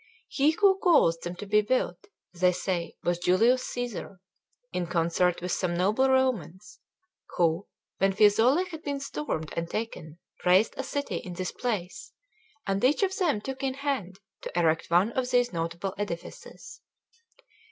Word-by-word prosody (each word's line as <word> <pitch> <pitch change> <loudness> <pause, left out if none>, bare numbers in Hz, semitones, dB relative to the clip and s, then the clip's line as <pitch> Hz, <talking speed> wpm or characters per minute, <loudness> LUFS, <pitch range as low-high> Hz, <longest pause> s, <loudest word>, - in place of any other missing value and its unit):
He 285 +2 +3
who 385 +4 +3
caused 170 - +4
them 175 +1 -5
to 205 - -7
built, 210 - 0 0.3
they 180 0 +2
say, 175 -1 -3
was 175 0 0
Julius 225 +9 +3
Cæsar, 240 -5 -5 0.6
in 180 -1 -2
concert 170 +1 +1
with 180 - -2
some 175 -2 -1
noble 215 +9 +2
Romans, 210 -6 0 0.6
who, 170 +2 +1 0.3
when 195 +1 +3
Fiesole 225 - +4
had 320 -2 -7
been 285 -3 -3
stormed 155 - -4
and 170 0 -3
taken, 170 -8 -5 0.3
raised 185 +5 +4
a - - -3
city 285 -1 -3
in 180 - -7
this 185 +1 -4
place, 200 -7 -4 0.5
and 195 +1 -1
each 285 +10 +3
of 380 0 +1
them 325 - +1
took 265 +3 -6
in 265 -1 -1
hand 265 -10 -3 0.2
to - - -6
erect 165 -1 +1
one 180 +6 +3
of 250 0 -2
these 245 -2 +2
notable 170 +3 -3
edifices. 175 -5 -7
200 Hz, 150 wpm, -27 LUFS, 175-260 Hz, 0.6 s, caused